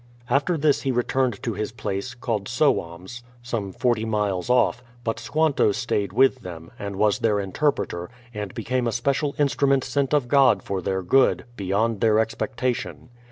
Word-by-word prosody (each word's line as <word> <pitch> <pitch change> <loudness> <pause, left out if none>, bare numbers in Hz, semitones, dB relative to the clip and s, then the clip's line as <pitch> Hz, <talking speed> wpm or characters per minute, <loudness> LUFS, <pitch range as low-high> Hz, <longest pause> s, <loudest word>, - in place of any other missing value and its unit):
After 145 +6 +2
this 150 -1 +2
he 135 - 0
returned 125 -2 0
to 115 - -1
his 105 +2 -3
place, 110 +1 -4
called 110 -4 -3
Sowams, 120 - -1 0.2
some 115 -5 -3
forty 120 +2 0
miles 105 -3 -1
off, 125 0 +3 0.2
but 115 -1 -2
Squanto 145 0 +2
stayed 100 -3 -1
with 130 +4 +3
them, 85 -6 -9
and 100 -1 -5
was 105 +1 +2
their 105 -2 +2
interpreter, 95 -4 -1 0.2
and 105 -3 -5
became 120 +2 -1
a - - 0
special 140 +4 0
instrument 140 -2 +2
sent 135 +1 -1
of 145 -4 +2
God 140 0 +4
for 95 -1 -3
their 95 +1 -2
good, 130 +9 +3
beyond 100 +2 0
their 110 -2 +4
expectation. 125 +2 -2
115 Hz, 160 wpm, -24 LUFS, 100-130 Hz, 0.2 s, God